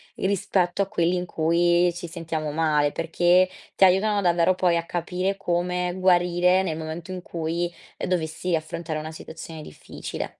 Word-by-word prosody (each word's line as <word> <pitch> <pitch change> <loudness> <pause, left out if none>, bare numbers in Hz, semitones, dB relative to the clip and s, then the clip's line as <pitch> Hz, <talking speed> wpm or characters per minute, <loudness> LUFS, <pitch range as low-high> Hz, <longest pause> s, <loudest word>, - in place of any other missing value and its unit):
i - - -4
rispetto 195 -2 0
a - - -6
quelli 175 -1 +1
in 180 - -2
cui 175 +2 +2
ci 175 0 -6
sentiamo 160 -2 -4
male, 150 -2 +2
perché 175 +3 +3 0.3
ti - - +3
aiutano 200 +2 +3
davvero 175 0 +3
poi 180 -2 +2
a 170 - -1
capire 180 +3 -2
come 180 -1 -1
guarire 180 0 +3
nel 160 -4 -2
momento 160 +3 -6
in 180 -1 -5
cui, 170 +1 -2 0.3
ehm, - - -3
dovessi 165 0 -1
affrontare 160 0 -4
una 155 +1 -6
situazione 160 0 -9
difficile. 75 - -7
175 Hz, 160 wpm, -24 LUFS, 165-180 Hz, 0.3 s, perché